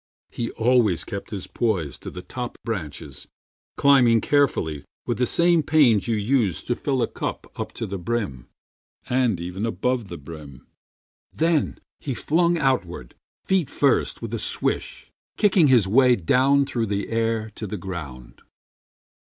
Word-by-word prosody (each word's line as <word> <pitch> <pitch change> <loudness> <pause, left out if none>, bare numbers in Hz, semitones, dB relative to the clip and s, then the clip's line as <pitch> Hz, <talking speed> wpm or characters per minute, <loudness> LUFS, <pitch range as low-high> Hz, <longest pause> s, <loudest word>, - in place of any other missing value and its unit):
He 115 - -3
always 115 -6 +3
kept 100 - -6
his 100 -4 -5
poise 90 - -2
To - - -7
the 90 - -9
top 125 +3 -6
branches, 75 - -5 0.5
climbing 125 -5 +5
carefully 110 - +1 0.2
With - - -2
the 125 - +2
same 170 -1 +4
pains 140 -9 +3
you 115 - +1
use 105 - +1
to 120 - -1
fill 130 0 -1
a - - 0
cup - - -5
Up - - -4
to - - -4
the 95 0 -5
brim, 90 - -3 0.6
and 125 -7 +1
even 90 +4 -5
above 115 +2 -1
the 85 - -7
brim. 75 -3 -11 0.7
Then 165 -2 0 0.2
he 135 -4 -4
flung 170 +5 +2
outward, 90 - -1 0.3
feet 190 -7 +1
first, 140 -4 +1
with 115 0 -5
a 115 - -1
swish, - - -2 0.3
Kicking 190 -6 +4
his 120 -7 +4
way 125 +4 +5
down 135 +9 +3
through 120 -4 -2
the 100 0 -2
air 115 -1 -1
to 110 0 -6
the 105 - -4
ground. 75 -10 -8
115 Hz, 150 wpm, -23 LUFS, 90-130 Hz, 0.7 s, climbing